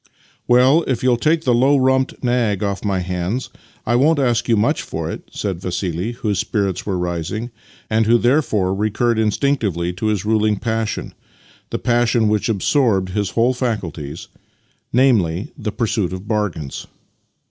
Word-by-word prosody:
" - - -33
Well, 130 +6 +5
if 130 -3 -1
you'll 125 -1 +4
take 155 +6 +1
the 125 - +2
low 135 +4 +4
rumped 130 0 +1
nag 120 -5 +1
off 100 -1 -2
my 100 -3 0
hands 90 +7 -3 0.3
I 120 - +1
won't 150 +6 +4
ask 120 -3 +1
you 115 - +4
much 105 - +1
for - - -4
it," - - -9
said 95 -4 -4
Vassili, 90 +3 -3
whose 110 -6 -2
spirits 100 -3 -1
were 95 -3 0
rising, 90 +7 -3 0.4
and 110 0 +1
who 120 +1 +5
therefore 120 -7 +1
recurred 110 +3 0
instinctively 105 - 0
to 100 +5 -3
his 105 -2 -1
ruling 110 -1 +2
passion 110 0 -3 0.3
— - - -29
the - - -2
passion 120 -2 +2
which 105 +1 0
absorbed 105 -3 +1
liis 100 -2 -2
whole 120 +5 +3
faculties 95 - -4 0.4
— - - -42
namely, 115 - +2
the 110 -6 -4
pursuit 105 -5 -1
of 95 +2 -7
bargains. 100 -10 -3
110 Hz, 165 wpm, -19 LUFS, 95-120 Hz, 0.4 s, Well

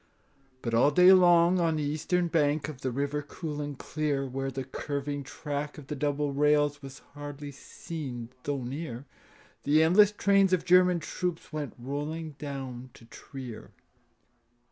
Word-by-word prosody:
But 115 - -2
all 120 +5 +5
day 180 +5 +7
long 175 -1 +5
on 165 -2 +2
the 155 - -1
eastern 160 +4 0
bank 150 -2 +1
Of 150 -4 -8
the 130 - -1
river 140 +3 -2
cool 150 0 -6
and 145 -2 -5
clear, 145 -3 -2
Where 135 +1 -3
the 135 0 -4
curving 145 +2 -4
track 145 +1 -5
of 150 - -10
the 150 - -5
double 145 0 -1
rails 145 0 +2
Was 135 0 -11
hardly 145 0 -7
seen 135 -4 -7
though 140 -1 -3
near, 135 0 -6 0.6
The 155 +2 +4
endless 195 +5 +6
trains 195 -2 +3
of 180 - +1
German 180 -1 +5
troops 175 -2 -4
Went 150 -3 -4
rolling 145 +5 -4
down 130 -4 -6
to 115 - -15
Trier. 125 -1 -10
145 Hz, 155 wpm, -28 LUFS, 135-160 Hz, 0.6 s, day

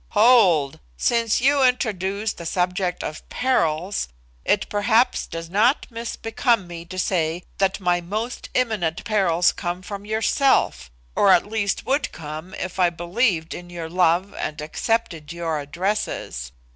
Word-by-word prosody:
"Hold! 190 - +5 0.2
Since 230 - +2
you 280 +2 +4
introduce 210 -5 +1
the 170 - -7
subject 180 +1 -1
of 155 - -5
perils, 185 -7 0 0.4
it 205 - +1
perhaps 220 +4 +2
does 165 0 -6
not 215 - +2
misbecome 230 -1 -1
me 170 -1 -8
to 185 +2 -9
say 175 -2 0 0.2
that 195 0 +1
my 175 -2 +1
most 215 +7 -4
imminent 210 -10 0
perils 185 -6 +3
come 175 +1 -4
from 200 +1 -7
yourself, 220 - +1 0.3
or 200 - +5
at 175 - +5
least 210 -2 -1
would 275 +3 0
come 155 +3 -8
if 185 0 -5
I 180 -1 +5
believed 175 0 0
in 175 0 -9
your 170 -2 -6
love 180 +2 +2
and 150 - -4
accepted 160 0 -2
your 165 -2 -2
addresses. 145 - -3
185 Hz, 140 wpm, -23 LUFS, 170-220 Hz, 0.4 s, Hold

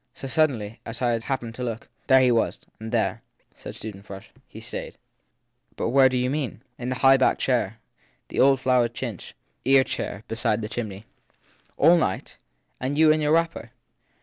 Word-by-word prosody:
So, 135 - -7
suddenly 120 -6 0
as 115 +1 -7
I 120 -2 +1
happened 120 -1 -4
to 125 - -6
look 115 -2 -4 0.2
there 130 -1 +6
he 125 -1 +4
was. 115 -1 +1 0.2
And 110 0 -7
there/ - - 0 0.3
said - - -9
Susan 105 -3 -7
Frush, 100 -1 -11 0.2
he - - -11
stayed/ - - -7 0.8
But - - -2
where 135 +1 +6
do 130 - -1
you 125 0 +1
mean? 135 -3 -3 0.2
In 120 +1 -4
the 130 - -1
high 135 +1 +5
backed - - +2
chair, 115 -5 0 0.5
the - - -4
old 135 0 +5
flowered 125 -2 +2
chintz 115 -8 -6 0.3
"ear 135 0 +5
chair" 110 -5 -5
beside 110 -1 0
the 105 - -4
chimney/ 110 -3 -5 0.4
< - - -35
All 170 +4 +6
night? 95 - -2 0.4
and 135 +3 -2
you 155 0 +6
in 155 0 +2
your 150 +1 +2
wrapper 165 -8 0
125 Hz, 185 wpm, -25 LUFS, 115-135 Hz, 0.8 s, there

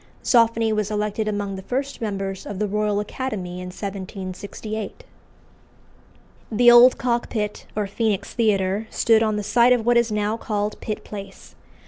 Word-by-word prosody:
Zoffany 230 -2 +3
was 215 -1 -1
elected 210 0 -1
among 205 -2 -2
the - - -6
first 270 +6 -3
members 195 -3 -4
of 205 - -5
the 210 - 0
Royal 210 0 0
Academy 205 -5 -4
in 180 - -6
1768. 195 +2 -6 1.5
The 240 +2 +6
old 240 +1 +8
Cockpit, 235 -3 -2
or 210 -1 0
Phœnix 205 0 -1
Theatre, 205 -2 0
stood 225 -1 +3
on 215 -1 +1
the 210 - -2
site 240 +4 +4
of 235 -3 0
what 240 0 +4
is 235 -1 +2
now 210 +1 0
called 210 -2 -3
Pitt 215 - -4
Place. 200 -2 -10
210 Hz, 150 wpm, -23 LUFS, 200-230 Hz, 1.5 s, old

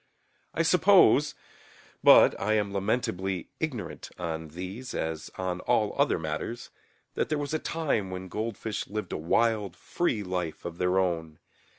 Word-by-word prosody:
I - - +2
suppose - - +5 0.7
(but - - +8
I 105 +2 +1
am 105 -2 0
lamentably 95 -3 -1
ignorant 140 -9 -4
on 80 -2 -4
these 95 +10 -7
as 80 -1 -3
on 90 -1 -2
all 110 0 +1
other 140 +1 +2
matters) 80 +9 -5 0.4
that - - -1
there 155 - +1
was 145 0 -3
a 155 - +1
time 145 -14 -1
when 95 0 -6
goldfish 110 +1 -4
lived 105 -3 -4
a - - -1
wild 105 +3 +1
free 115 - -1
life 90 -4 -4
of 85 0 -6
their 90 +1 +2
own. 80 -4 -1
95 Hz, 150 wpm, -28 LUFS, 90-115 Hz, 0.7 s, but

